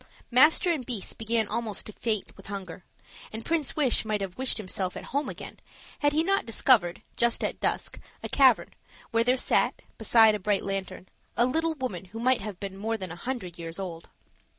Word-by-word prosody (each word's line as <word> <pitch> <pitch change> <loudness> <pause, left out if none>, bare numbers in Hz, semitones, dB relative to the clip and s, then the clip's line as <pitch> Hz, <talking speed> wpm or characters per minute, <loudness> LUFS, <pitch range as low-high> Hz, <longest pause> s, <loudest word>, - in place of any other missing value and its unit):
Master 300 +7 +5
and 305 -6 -1
beast 230 -6 -4
began 225 -1 0
almost 220 -2 -3
to 215 - -7
faint 215 -3 -2
with - - -14
hunger; 190 -3 -7 0.5
and 220 +1 -7
Prince 325 -4 0
Wish 280 -6 +3
might 215 -1 -1
have 195 -2 -5
wished 260 0 +2
himself 185 -3 -3
at - - -7
home 285 +1 0
again, - - -9 0.4
had 290 -1 +3
he 310 +2 +2
not 390 +3 +2
discovered, 225 -6 +2
just 235 0 +1
at - - -2
dusk, - - -2 0.2
a - - -2
cavern, 265 -4 +4 0.4
where 230 0 +3
there 250 +2 +3
sat, - - +2 0.2
beside 220 0 +6
a 210 - -2
bright 205 +1 0
lantern, 195 -1 -4 0.3
a 240 - +5
little 320 +5 0
woman 210 - -4
who 210 +5 -9
might 255 0 +2
have 200 -3 -6
been 195 -1 -6
more 225 +3 -2
than 185 -4 -6
a - - -6
hundred 185 -4 -5
years 165 0 -6
old. 175 -4 -6
220 Hz, 195 wpm, -27 LUFS, 195-255 Hz, 0.5 s, beside